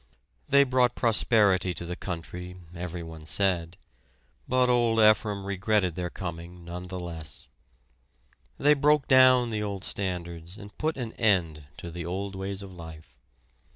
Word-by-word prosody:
They 140 Hz, +1 st, +6 dB
brought 125 Hz, -2 st, +2 dB
prosperity 105 Hz, -6 st, +3 dB
to 85 Hz, -, -5 dB
the 90 Hz, +1 st, -4 dB
country, 90 Hz, 0 st, -6 dB, 0.2 s
everyone 85 Hz, -2 st, -7 dB
said, 85 Hz, -1 st, +1 dB, 0.7 s
but 130 Hz, 0 st, +3 dB
old 120 Hz, -2 st, +2 dB
Ephraim 105 Hz, -2 st, +3 dB
regretted 100 Hz, -1 st, 0 dB
their 90 Hz, +1 st, -3 dB
coming, 85 Hz, 0 st, -7 dB
none 90 Hz, +1 st, -7 dB
the 95 Hz, +1 st, -6 dB
less. 85 Hz, -3 st, -7 dB, 1.1 s
They 150 Hz, +1 st, +5 dB
broke 150 Hz, -1 st, +3 dB
down 130 Hz, -2 st, +6 dB
the 105 Hz, -1 st, -2 dB
old 100 Hz, -2 st, -4 dB
standards, 85 Hz, -2 st, -4 dB
and 100 Hz, -1 st, -12 dB
put 155 Hz, 0 st, -1 dB
an 120 Hz, -4 st, -5 dB
end 85 Hz, -9 st, +1 dB
to 85 Hz, -, -8 dB
the 85 Hz, 0 st, -6 dB
old 95 Hz, +4 st, -4 dB
ways 95 Hz, +1 st, -5 dB
of 95 Hz, -1 st, -10 dB
life. 80 Hz, -7 st, -12 dB
95 Hz, 145 wpm, -27 LUFS, 85-110 Hz, 1.1 s, They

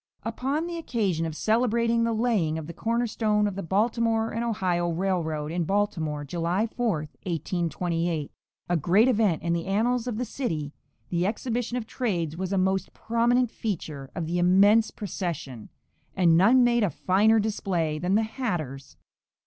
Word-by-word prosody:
Upon 270 Hz, +8 st, -2 dB
the 345 Hz, 0 st, -4 dB
occasion 195 Hz, -, -1 dB
of 160 Hz, -, -6 dB
celebrating 230 Hz, +2 st, +2 dB
the 230 Hz, -, 0 dB
laying 215 Hz, -9 st, +1 dB
of 160 Hz, -, -5 dB
the 170 Hz, -, -8 dB
cornerstone 225 Hz, -2 st, 0 dB
of 205 Hz, -, -1 dB
the 195 Hz, -, -4 dB
Baltimore 225 Hz, +4 st, +1 dB
and 230 Hz, +2 st, -2 dB
Ohio 185 Hz, -7 st, 0 dB
Railroad 165 Hz, -4 st, -1 dB
in 175 Hz, 0 st, -1 dB
Baltimore, 160 Hz, -6 st, -1 dB
July 170 Hz, +7 st, 0 dB
4, 230 Hz, -5 st, -1 dB, 0.3 s
1828 170 Hz, -2 st, -2 dB, 0.4 s
(a 175 Hz, -, +1 dB
great 185 Hz, -, +4 dB
event 215 Hz, -9 st, +2 dB
in 170 Hz, 0 st, 0 dB
the 170 Hz, +1 st, -2 dB
annals 235 Hz, +5 st, +1 dB
of 235 Hz, -4 st, -2 dB
the 250 Hz, -, -1 dB
city), 160 Hz, -, -3 dB, 0.4 s
the 175 Hz, +1 st, 0 dB
exhibition 240 Hz, +2 st, -2 dB
of 235 Hz, -, -4 dB
trades 175 Hz, -, -2 dB
was 185 Hz, +2 st, -4 dB
a 195 Hz, -, +1 dB
most 190 Hz, 0 st, 0 dB
prominent 235 Hz, +1 st, +1 dB
feature 155 Hz, -10 st, -5 dB
of 170 Hz, -, -2 dB
the 175 Hz, +2 st, -1 dB
immense 200 Hz, +5 st, +5 dB
procession, 165 Hz, -, -5 dB, 0.5 s
and 170 Hz, -3 st, +4 dB
none 225 Hz, +9 st, +6 dB
made 240 Hz, -1 st, +3 dB
a 200 Hz, -, +2 dB
finer 205 Hz, +6 st, +3 dB
display 180 Hz, -7 st, -1 dB
than 180 Hz, +4 st, +1 dB
the 220 Hz, -, +3 dB
hatters. 175 Hz, -, -4 dB
195 Hz, 160 wpm, -26 LUFS, 170-230 Hz, 0.5 s, none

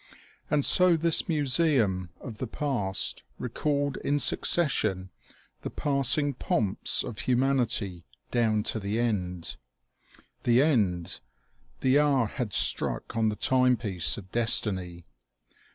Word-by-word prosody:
And 145 Hz, -2 st, +1 dB
so 180 Hz, -2 st, +4 dB
this 165 Hz, +1 st, +2 dB
museum 135 Hz, -, +2 dB
of 110 Hz, -3 st, -9 dB
the 130 Hz, -, -3 dB
past 110 Hz, -8 st, -2 dB, 0.2 s
recalled 145 Hz, -2 st, -2 dB
in 145 Hz, -, -1 dB
succession 110 Hz, -, +1 dB, 0.5 s
the -, -, -5 dB
passing 140 Hz, 0 st, +1 dB
pomps 105 Hz, -5 st, -1 dB
of 110 Hz, -, -7 dB
humanity 120 Hz, -8 st, 0 dB, 0.3 s
down 110 Hz, -3 st, +1 dB
to 110 Hz, -, -2 dB
the 100 Hz, +2 st, -3 dB
end. 90 Hz, -7 st, -2 dB, 0.8 s
The 120 Hz, 0 st, +3 dB
end! 105 Hz, -, +1 dB, 0.6 s
The 130 Hz, +2 st, +4 dB
hour 140 Hz, -4 st, +2 dB
had 110 Hz, 0 st, -4 dB
struck -, -, -1 dB
on 110 Hz, -1 st, +2 dB
the 105 Hz, -, -3 dB
time 125 Hz, +1 st, +2 dB
piece 100 Hz, -7 st, 0 dB
of 95 Hz, -3 st, -11 dB
destiny. 95 Hz, -7 st, 0 dB
120 Hz, 120 wpm, -27 LUFS, 100-140 Hz, 0.8 s, so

